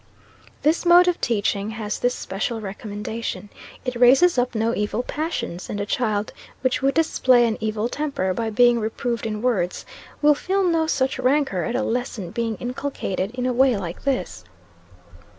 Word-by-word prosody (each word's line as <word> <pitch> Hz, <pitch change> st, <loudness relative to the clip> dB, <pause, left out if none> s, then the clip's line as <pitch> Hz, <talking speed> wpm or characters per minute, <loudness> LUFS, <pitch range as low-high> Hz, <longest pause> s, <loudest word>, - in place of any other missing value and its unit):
This 310 Hz, +3 st, +2 dB
mode 350 Hz, +1 st, +7 dB
of 355 Hz, -, +1 dB
teaching 205 Hz, -3 st, 0 dB
has 210 Hz, -2 st, -3 dB
this 245 Hz, 0 st, +1 dB
special 215 Hz, +4 st, -3 dB
recommendation 210 Hz, +1 st, -5 dB, 0.4 s
it 250 Hz, -1 st, -2 dB
raises 260 Hz, +9 st, +5 dB
up 245 Hz, -1 st, -1 dB
no 225 Hz, +1 st, +1 dB
evil 210 Hz, +3 st, -1 dB
passions: 300 Hz, -, -4 dB
and 205 Hz, -, -3 dB
a 200 Hz, -, -1 dB
child 215 Hz, -2 st, -1 dB, 0.3 s
which 255 Hz, -1 st, 0 dB
would 275 Hz, +1 st, +1 dB
display 260 Hz, -6 st, +4 dB
an 225 Hz, -2 st, 0 dB
evil 215 Hz, 0 st, -1 dB
temper 275 Hz, -9 st, -2 dB
by 225 Hz, +2 st, -2 dB
being 240 Hz, +2 st, +4 dB
reproved 230 Hz, +1 st, -2 dB
in 215 Hz, 0 st, -4 dB
words, 190 Hz, -8 st, 0 dB, 0.3 s
will 295 Hz, 0 st, +5 dB
feel 385 Hz, +6 st, 0 dB
no 330 Hz, -3 st, +2 dB
such 265 Hz, -3 st, 0 dB
rancor 260 Hz, -7 st, +1 dB
at 240 Hz, -, -2 dB
a 260 Hz, -, 0 dB
lesson 235 Hz, -7 st, -3 dB
being 230 Hz, 0 st, -2 dB
inculcated 245 Hz, -7 st, -3 dB
in 250 Hz, 0 st, -2 dB
a 255 Hz, -, +1 dB
way 255 Hz, -2 st, +4 dB
like 175 Hz, -3 st, -6 dB
this. 275 Hz, -2 st, -2 dB
240 Hz, 170 wpm, -23 LUFS, 210-270 Hz, 0.4 s, mode